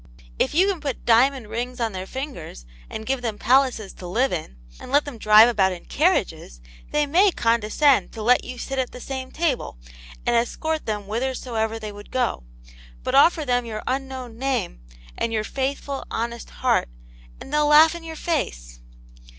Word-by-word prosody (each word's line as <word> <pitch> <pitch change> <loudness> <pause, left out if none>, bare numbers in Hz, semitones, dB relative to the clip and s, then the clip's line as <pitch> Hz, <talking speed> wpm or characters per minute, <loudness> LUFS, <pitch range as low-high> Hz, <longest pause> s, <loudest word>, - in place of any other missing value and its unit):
If - - +1
you 365 +4 +5
can 380 -5 -1
put 280 -4 -4
diamond 245 +1 +3
rings 245 +3 -4
on 230 -2 0
their 190 -1 -6
fingers, 255 - -7 0.2
and 220 - -6
give 265 0 -1
them 225 -4 -3
palaces 250 -4 +2
to 180 - -9
live 240 +8 +1
in, 155 - -5 0.2
and - - -10
let 290 +1 +3
them 275 -6 -8
drive 215 +2 +7
about 195 -6 +2
in 175 - -10
carriages, 185 - 0 0.3
they 300 0 +1
may 360 +8 +4
condescend 235 - +2
to 220 - -6
let 245 +3 +4
you 250 0 -7
sit 270 +2 -4
at 255 - -2
the 250 - -8
same 260 0 -5
table, 305 - -2 0.5
and 240 - +2
escort 310 +7 -1
them 210 -1 -2
whitherso 245 +4 -3
ever 220 0 -1
they 215 -1 -6
would 205 0 -12
gcf. 250 - -1 0.6
But - - -2
offer 310 +2 +5
them 245 -1 +1
your 220 -2 -6
unknown 260 -3 -4
name, 260 - -2 0.3
and 230 - -2
your 215 -1 0
faithful, 275 +3 -3
honest 235 +1 -4
heart, - - 0 0.5
and 275 - -10
they'll 300 0 +3
laugh 310 +2 +7
in 340 -1 -8
your 325 -1 -7
face - - -3
250 Hz, 185 wpm, -23 LUFS, 220-280 Hz, 0.6 s, drive